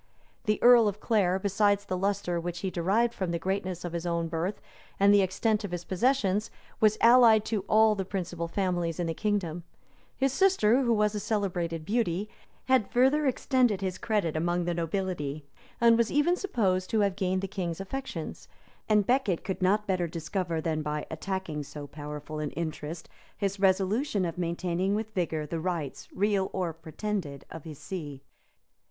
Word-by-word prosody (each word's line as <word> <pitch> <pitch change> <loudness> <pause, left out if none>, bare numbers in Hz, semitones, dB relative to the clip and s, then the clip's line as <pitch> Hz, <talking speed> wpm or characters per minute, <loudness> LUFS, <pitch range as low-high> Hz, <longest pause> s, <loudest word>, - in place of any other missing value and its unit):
The 210 0 +2
earl 240 -2 +8
of 205 0 -2
Clare, 195 -5 +2
besides 200 +1 +1
the 185 - -2
lustre 195 -2 -1
which 175 +1 -5
he 190 - -2
derived 205 +8 +1
from 185 -5 -3
the 170 - 0
greatness 185 0 -3
of 175 - -5
his 170 -1 -3
own 170 -1 -1
birth 170 +5 -2 0.4
and 200 +1 +6
the 205 - +6
extent 210 +3 0
of 205 - -4
his 175 -1 -4
possessions, 215 0 +1 0.3
was 215 -1 +4
allied 230 -2 +7
to 215 -4 -1
all 220 0 +5
the 195 -2 -2
principal 180 -3 -4
families 175 -3 -1
in 175 - 0
the 165 - -1
kingdom; 175 -4 -2 0.5
his 270 -1 +1
sister, 275 - +4
who 240 -3 +1
was 210 -1 +2
a 210 - -2
celebrated 175 -6 -2
beauty, 205 -3 0 0.4
had 260 -5 +3
further 270 +4 +3
extended 250 -5 +2
his 185 -1 -3
credit 205 -8 0
among 175 +2 0
the 175 - 0
nobility 165 -4 -3 0.3
and 235 -1 +5
was 230 - +2
even 295 +5 +3
supposed 195 - 0
to 220 - +2
have 200 -2 +1
gained 185 -1 0
the 195 - -3
king's 180 -3 -4
affections; 270 +8 -6 0.4
and 210 -2 +4
Becket 245 -8 +1
could 190 -1 -4
not 205 +3 +2
better 185 -3 0
discover, 170 +1 -3
than 155 -1 -1
by 150 0 -3
attacking 165 -2 -3
so 145 0 -8
powerful 150 +1 -7
an 150 -1 -2
interest, 160 0 -5 0.3
his 200 -1 -2
resolution 195 +3 +2
of 165 - -3
maintaining 180 +3 -1
with 220 0 -4
vigor 160 -5 -1
the 165 +2 -4
rights, 165 -5 -3
real 200 -1 +1
or 180 -3 -1
pretended, 165 -1 -5
of 160 -2 -9
his 155 -3 -8
see. 145 -7 -7
190 Hz, 175 wpm, -28 LUFS, 170-210 Hz, 0.5 s, earl